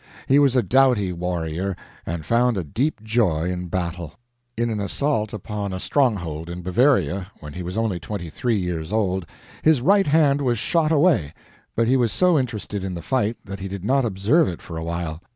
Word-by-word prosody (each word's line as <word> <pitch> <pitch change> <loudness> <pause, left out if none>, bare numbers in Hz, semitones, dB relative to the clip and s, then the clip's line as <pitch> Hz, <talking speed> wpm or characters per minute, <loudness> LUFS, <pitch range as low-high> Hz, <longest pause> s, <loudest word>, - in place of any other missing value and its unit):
He 135 +2 +4
was 140 -3 +4
a 125 - +4
doughty 125 -8 +3
warrior 90 +1 -2 0.3
and 80 -1 -4
found 120 -1 +2
a 95 - -1
deep 115 - -2
joy 95 -7 +1
in 90 0 -4
battle. 85 -2 -4 0.4
In 120 0 0
an 110 - -2
assault 110 +1 -1
upon 105 -1 -4
a 95 - -3
stronghold 90 - 0
in 90 +1 -6
Bavaria 95 - +2
when 75 -1 -9
he 90 - -6
was 90 +3 -5
only 110 -6 0
twenty 95 -1 -5
three 120 +3 0
years 90 -3 -3
old, 95 -5 0 0.3
his 155 -3 +4
right 195 +8 +4
hand 145 -2 +3
was 125 -3 +1
shot 160 +7 +1
away, 145 - +3 0.4
but 115 0 +2
he 130 +2 +4
was 120 -4 +2
so 180 - +3
interested 105 -5 -3
in 95 -1 -4
the 85 - -7
fight 120 -4 0
that 100 -1 -7
he 95 - -5
did 95 -1 -6
not 135 +3 +3
observe 115 - +2
it 85 - -4
for 85 - -9
a 80 - -4
while. 85 -1 -4
100 Hz, 200 wpm, -23 LUFS, 90-125 Hz, 0.4 s, He